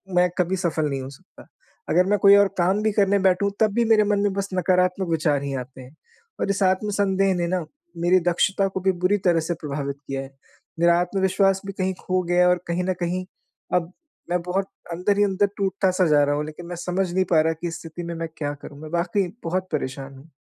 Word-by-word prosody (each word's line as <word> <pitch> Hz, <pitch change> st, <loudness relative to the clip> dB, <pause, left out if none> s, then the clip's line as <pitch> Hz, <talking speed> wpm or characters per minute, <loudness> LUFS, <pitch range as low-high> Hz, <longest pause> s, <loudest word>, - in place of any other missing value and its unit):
मैं 180 Hz, 0 st, +4 dB
कभी 180 Hz, +1 st, +1 dB
सफ़ल 160 Hz, -4 st, -1 dB
नहीं 135 Hz, -1 st, -3 dB
हो 130 Hz, -, -7 dB
सकता। 135 Hz, -, -17 dB, 0.4 s
अगर 180 Hz, +2 st, +4 dB
मैं 205 Hz, -, +3 dB
कोई 200 Hz, +2 st, +7 dB
और 200 Hz, -, +5 dB
काम 190 Hz, +4 st, +2 dB
भी 215 Hz, -, +2 dB
करने 200 Hz, -1 st, +3 dB
बैठूँ 190 Hz, +1 st, +2 dB
तब 215 Hz, -2 st, +3 dB
भी 235 Hz, +2 st, +2 dB
मेरे 220 Hz, -2 st, +5 dB
मन 205 Hz, 0 st, +1 dB
में 200 Hz, -1 st, +1 dB
बस 200 Hz, 0 st, -3 dB
नकारात्मक 180 Hz, +1 st, +1 dB
विचार 155 Hz, -3 st, +1 dB
ही 140 Hz, -1 st, -3 dB
आते 130 Hz, +1 st, -15 dB
हैं। 130 Hz, +4 st, -14 dB, 0.5 s
और -, -, 0 dB
इस 200 Hz, +1 st, -1 dB
आत्मसंदेह 195 Hz, 0 st, +1 dB
ने 175 Hz, -1 st, -1 dB
ना 180 Hz, -2 st, -1 dB, 0.4 s
मेरी 185 Hz, +1 st, +5 dB
दक्षता 190 Hz, +3 st, +2 dB
को 190 Hz, 0 st, -4 dB
भी 190 Hz, -, +3 dB
बुरी 205 Hz, +3 st, +3 dB
तरह 170 Hz, -2 st, +4 dB
से 165 Hz, +2 st, -2 dB
प्रभावित 140 Hz, -1 st, -4 dB
किया 135 Hz, 0 st, -3 dB
है। 135 Hz, 0 st, -10 dB, 0.5 s
मेरा 170 Hz, 0 st, +4 dB
आत्मविश्वास 190 Hz, +1 st, +1 dB
भी 195 Hz, -, -5 dB
कहीं 190 Hz, -1 st, -1 dB
खो 185 Hz, 0 st, 0 dB
गया 175 Hz, +1 st, +1 dB
है 180 Hz, -, +6 dB
और 180 Hz, 0 st, +2 dB
कहीं 170 Hz, +1 st, -1 dB
न 185 Hz, -, +1 dB
कहीं 180 Hz, +1 st, -2 dB, 0.5 s
अब 175 Hz, -1 st, 0 dB, 0.4 s
मैं 180 Hz, -, +1 dB
बहुत 190 Hz, +2 st, -1 dB, 0.3 s
अंदर 185 Hz, +4 st, 0 dB
ही 205 Hz, -, +4 dB
अंदर 200 Hz, 0 st, +1 dB
टूटता 195 Hz, -1 st, +1 dB
सा 185 Hz, 0 st, +2 dB
जा 150 Hz, -2 st, +4 dB
रहा 145 Hz, 0 st, +1 dB
हूँ 150 Hz, +1 st, -2 dB
लेकिन 155 Hz, +3 st, -9 dB
मैं 175 Hz, -, -5 dB
समझ 180 Hz, +1 st, -2 dB
नहीं 190 Hz, +1 st, +2 dB
पा 160 Hz, -, +5 dB
रहा 160 Hz, +1 st, +1 dB
कि 175 Hz, -, -2 dB
इस 165 Hz, -, -5 dB
स्थिति 165 Hz, +1 st, -8 dB
में 170 Hz, 0 st, -5 dB
मैं 165 Hz, 0 st, -4 dB
क्या 145 Hz, -1 st, -2 dB
करूँ? 145 Hz, -, -10 dB
मैं 155 Hz, -, -8 dB
वाक़ई 175 Hz, +1 st, 0 dB
बहुत 185 Hz, +3 st, -2 dB
परेशान 135 Hz, +1 st, -4 dB
हूँ। 150 Hz, +4 st, -17 dB
180 Hz, 235 wpm, -23 LUFS, 165-195 Hz, 0.5 s, कोई